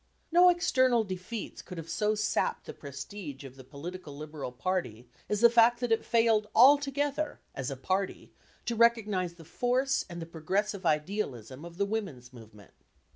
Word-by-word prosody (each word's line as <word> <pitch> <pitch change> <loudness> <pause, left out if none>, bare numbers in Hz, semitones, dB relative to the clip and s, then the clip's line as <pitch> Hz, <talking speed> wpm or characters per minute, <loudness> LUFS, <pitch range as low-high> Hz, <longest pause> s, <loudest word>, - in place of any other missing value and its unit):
No 355 +2 +7
external 260 -9 +3
defeats 190 +3 -6
could 180 - -10
have 165 -1 -7
so 210 +4 0
sapped 215 +1 -1
the - - -7
prestige 140 +2 -8
of 135 -1 -10
the 130 - -12
political 145 +3 -8
Liberal 150 -3 -6
party 125 - -3 0.2
as 210 0 0
the 235 - +8
fact 235 0 +5
that 245 -2 -2
it 225 - +2
failed 225 -2 +3
altogether, 285 +3 +4
as 135 0 -4
a 135 - -5
party, 185 +8 -2 0.3
to 235 - -1
recognise 215 -6 +2
the 165 -2 -14
force 255 - 0
and 175 -1 -7
the 165 - -5
progressive 185 +4 -2
idealism 150 - -2
of 170 0 -10
the 200 - +1
women's 175 - -5
movement. 110 -5 -15
190 Hz, 165 wpm, -30 LUFS, 150-230 Hz, 0.3 s, the